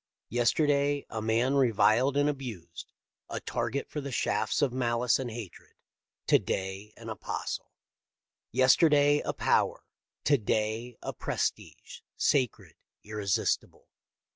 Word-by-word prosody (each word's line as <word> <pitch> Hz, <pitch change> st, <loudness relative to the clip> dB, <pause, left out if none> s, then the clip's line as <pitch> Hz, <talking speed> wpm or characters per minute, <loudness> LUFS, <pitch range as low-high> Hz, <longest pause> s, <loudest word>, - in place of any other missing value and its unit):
Yesterday 140 Hz, +4 st, +2 dB
a 110 Hz, -, -3 dB
man 115 Hz, +4 st, +1 dB
reviled 130 Hz, +1 st, +3 dB
and 145 Hz, 0 st, +3 dB
abused, 115 Hz, -, -6 dB, 0.4 s
a -, -, -3 dB
target 140 Hz, -, -3 dB
for 150 Hz, -, -5 dB
the 140 Hz, 0 st, -6 dB
shafts 110 Hz, +1 st, 0 dB
of 130 Hz, -4 st, +1 dB
malice 120 Hz, -1 st, +1 dB
and 130 Hz, -2 st, -3 dB
hatred: 110 Hz, -5 st, -9 dB, 0.5 s
to -, -, +5 dB
day 95 Hz, +2 st, -4 dB
an 115 Hz, -, -11 dB
apostle. 110 Hz, -4 st, -5 dB, 0.8 s
Yesterday 145 Hz, +3 st, +5 dB
a -, -, -2 dB
power: -, -, +1 dB, 0.4 s
to 145 Hz, -3 st, +3 dB
day 110 Hz, +2 st, -1 dB
a -, -, -4 dB
prestige, -, -, -4 dB, 0.2 s
sacred, 130 Hz, -6 st, 0 dB, 0.3 s
irresistible. 105 Hz, -2 st, -2 dB
120 Hz, 115 wpm, -29 LUFS, 110-140 Hz, 0.8 s, to